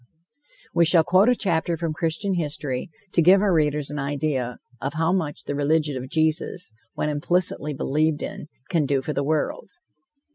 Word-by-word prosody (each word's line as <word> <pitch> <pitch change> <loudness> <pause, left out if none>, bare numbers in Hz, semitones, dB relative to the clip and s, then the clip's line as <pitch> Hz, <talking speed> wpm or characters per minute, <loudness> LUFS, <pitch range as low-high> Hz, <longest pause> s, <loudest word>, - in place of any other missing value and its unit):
We 170 - +4
shall 165 0 +5
quote 185 +7 +4
a 250 - +4
chapter 170 -5 0
from 165 -1 -2
Christian 165 +5 -1
history 145 -6 -2 0.2
to 170 - +4
give 185 +4 +7
our 200 -2 +2
readers 150 -2 +1
an 150 - -4
idea 140 -3 -2 0.2
of 140 +2 -3
how 165 +2 +1
much 160 -6 -2
the - - -4
religion 150 +1 +1
of 130 0 -5
Jesus, 160 -1 0 0.2
when - - -1
implicitly 150 0 0
believed 150 +3 0
in, - - -6 0.2
can 160 -5 +1
do 135 -1 +1
for 150 - -3
the 140 - -1
world. 155 - -1
155 Hz, 175 wpm, -24 LUFS, 145-170 Hz, 0.2 s, give